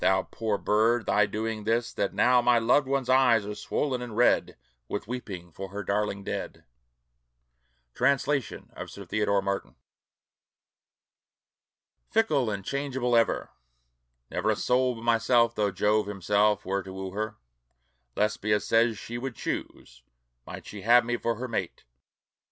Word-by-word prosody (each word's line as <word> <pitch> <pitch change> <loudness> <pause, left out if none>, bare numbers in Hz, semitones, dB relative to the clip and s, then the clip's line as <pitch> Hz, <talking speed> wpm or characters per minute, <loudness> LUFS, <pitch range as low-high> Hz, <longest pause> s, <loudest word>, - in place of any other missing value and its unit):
Thou 95 0 +3
Poor 110 -3 -2
bird, 115 +3 +2
thy 105 -1 +3
doing 110 0 -3
'tis, 115 +2 0
that 100 - -1
now 125 0 +4
My 120 0 +4
loved 120 +5 +3
one's 135 -2 0
eyes 125 -5 +4
are 105 - -4
swollen 125 +5 -2
and 120 -3 -7
red, 120 - +3 0.3
With 100 - -4
weeping 95 -8 -6
for 95 +4 -7
her 100 +2 -5
darling 100 0 -1
dead. - - -5 1.3
Translation 140 -1 0
of - - -7
Sir 100 - -10
Theodore 100 +1 +1
Martin. 100 -11 -3 2.3
"FICKLE 150 - +2
AND 100 -2 -4
CHANGEABLE 130 -3 -1
EVER" 115 -1 +1 0.8
Never - - -1
a - - +3
soul 125 0 +1
but 115 - -10
myself, 115 0 +3
though 105 -3 +1
Jove 105 +2 +1
himself 105 +1 +1
were 100 +1 -1
to 95 - -10
woo 95 0 -6
her, 110 +2 -3 0.8
Lesbia 105 0 +1
says 115 0 +2
she 120 +3 -6
would 130 -1 -5
choose, 60 - -6 0.5
might - - -8
she 105 - -8
have 120 +3 +5
me 120 0 0
for 115 -1 -1
her 130 +2 -5
mate. 100 -7 -4
110 Hz, 145 wpm, -27 LUFS, 100-120 Hz, 2.3 s, have